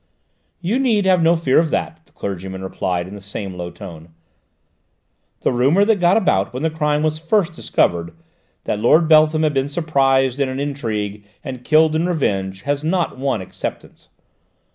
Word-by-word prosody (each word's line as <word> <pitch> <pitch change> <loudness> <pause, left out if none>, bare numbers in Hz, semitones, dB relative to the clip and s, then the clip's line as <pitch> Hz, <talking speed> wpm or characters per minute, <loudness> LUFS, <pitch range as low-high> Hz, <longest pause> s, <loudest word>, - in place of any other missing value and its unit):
"You 200 +9 0
need 225 -7 +2
have 185 -2 +4
no 165 +1 +4
fear 155 -5 +3
of 165 -1 +1
that," 160 +1 -3
the - - -28
clergyman 95 -1 -6
replied 90 -2 -2
in 95 - -10
the 100 - -9
same 100 0 -6
low 90 -1 -6
tone. 85 -1 -11 1.3
"The - - +1
rumour 140 +11 +3
that 215 -2 +2
got 175 +3 +4
about 100 - +1
when 130 - -4
the 160 - +1
crime 150 -1 0
was 155 0 0
first 175 +1 +1
discovered, 85 - 0 0.5
that 105 - -2
Lord 155 +9 +4
Beltham 155 0 +5
had 155 -1 +1
been 135 0 0
surprised 135 -4 +1
in 140 -2 +1
an 130 +1 -4
intrigue 110 -8 -4 0.2
and 130 -3 -7
killed 155 +1 +4
in 165 +3 +1
revenge, 95 - -1
has 145 +1 -2
not 170 -4 -1
won 135 -6 -1
acceptance. 95 - -8
140 Hz, 175 wpm, -19 LUFS, 100-160 Hz, 1.3 s, Beltham